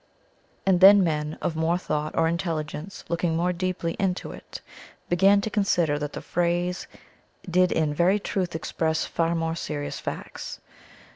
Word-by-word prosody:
And 190 -2 +4
then 200 +1 +9
men 150 -2 -1
of 160 - -1
more 160 +2 +1
thought 150 -4 -3
or 165 - +4
intelligence, 165 +1 -3
looking 170 0 0
more 175 +2 +1
deeply 175 -1 -2
into 190 -2 -1
it, - - -10 0.5
began 195 +3 +5
to 220 - -3
consider 175 -8 +1
that 150 0 -4
the - - -6
phrase 175 +1 -1 0.6
did 180 +1 +3
in 155 -2 +1
very 180 +6 +3
truth 185 -4 -2
express 160 0 -1
far 170 0 0
more 165 0 -1
serious 150 -3 -4
facts. - - -6
170 Hz, 150 wpm, -25 LUFS, 160-185 Hz, 0.6 s, then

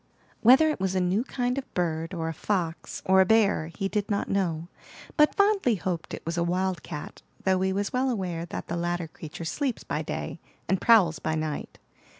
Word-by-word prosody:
Whether 265 +7 +7
it - - -4
was 190 0 -1
a - - +3
new 185 +5 +1
kind 250 0 -1
of 265 - -11
bird, 165 -2 -1
or 165 -1 -2
a 165 - -2
fox, 170 -1 -3
or 190 0 +6
a - - +5
bear, 210 -7 +3
he 195 +4 -3
did 205 0 -2
not 200 -1 0
know, 170 -4 0 0.5
but 300 0 +4
fondly 400 - +3
hoped 180 -3 -3
it - - -12
was 170 +1 -2
a - - +2
wildcat; 180 -3 -3 0.2
though 190 -1 +2
he 190 0 +1
was 200 +1 -2
well 260 +1 +1
aware 180 -7 -2
that - - -6
the 170 - -3
latter 175 0 -1
creature 160 +1 -8
sleeps 265 - -2
by - - -2
day, - - -5 0.3
and 190 - +1
prowls 185 -10 +5
by 155 - -1
night. 155 -1 -4
190 Hz, 200 wpm, -27 LUFS, 170-220 Hz, 0.5 s, Whether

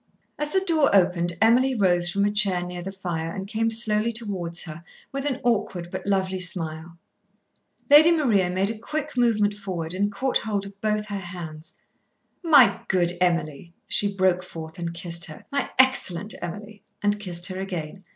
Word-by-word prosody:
As 300 0 -2
the 380 - +2
door 315 -5 +3
opened 175 -2 +3
Emily 255 +4 +4
rose 175 -4 +3
from 200 +3 +1
a 205 - +1
chair 200 -4 +3
near 180 0 -6
the 190 +2 -6
fire 170 -4 -4
and 190 -1 -5
came 225 +2 -1
slowly 225 0 +1
towards 190 -7 -4
her, 165 +1 -9 0.3
with 275 +1 -4
an 265 -2 -2
awkward 200 -7 -1
but - - -6
lovely 190 -1 0
smile. 170 -2 -1 0.9
Lady 300 +3 +8
Maria 235 - +2
made 190 +3 +1
a 220 - -8
quick 305 +4 -4
movement 220 -4 +2
forward 185 -5 -5
and 205 +2 0
caught 255 +6 0
hold 205 -2 -3
of 200 0 -13
both 210 -1 0
her 200 -1 -3
hands. 170 -4 -9 0.7
"My 300 -8 +5
good 175 -2 +2
Emily," 170 -2 -1
she 205 -1 +3
broke 185 -2 +2
forth 160 -2 -10
and 170 -1 -3
kissed 170 0 -2
her. 155 - -11
"My 280 0 -1
excellent 220 -7 +2
Emily," 205 +4 -7 0.2
and 205 0 +1
kissed 175 -4 -3
her 185 0 -5
again. 185 -1 -6
195 Hz, 175 wpm, -24 LUFS, 175-220 Hz, 0.9 s, Lady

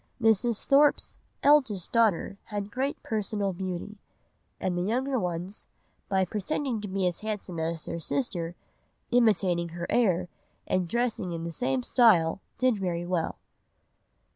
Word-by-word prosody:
Mrs. 225 0 +2
Thorpe's 285 +1 +3 0.2
"eldest 260 - +4
daughter 210 -4 +2
has 205 -2 -4
great 265 +6 -2
personal 205 -2 -1
beauty; 185 +3 -5 0.6
and 185 -1 -1
the 175 - 0
younger 255 +7 0
ones 180 +2 -3 0.4
by 190 -1 +2
pretending 225 - -2
to 205 - -5
be 190 -1 -1
as 175 -2 0
handsome 205 -5 -4
as 160 0 -2
their 170 - -4
sister, 175 - -2 0.6
imitating 195 -8 +3
her 170 +1 -5
air, 185 -7 +2 0.4
and 185 -1 0
dressing 225 -4 -1
in 165 0 -4
the 170 - -4
same 135 -5 0
style, 195 - +4 0.2
did 255 -5 +2
very 175 -2 -2
well." 175 -2 -1
195 Hz, 140 wpm, -28 LUFS, 175-230 Hz, 0.6 s, eldest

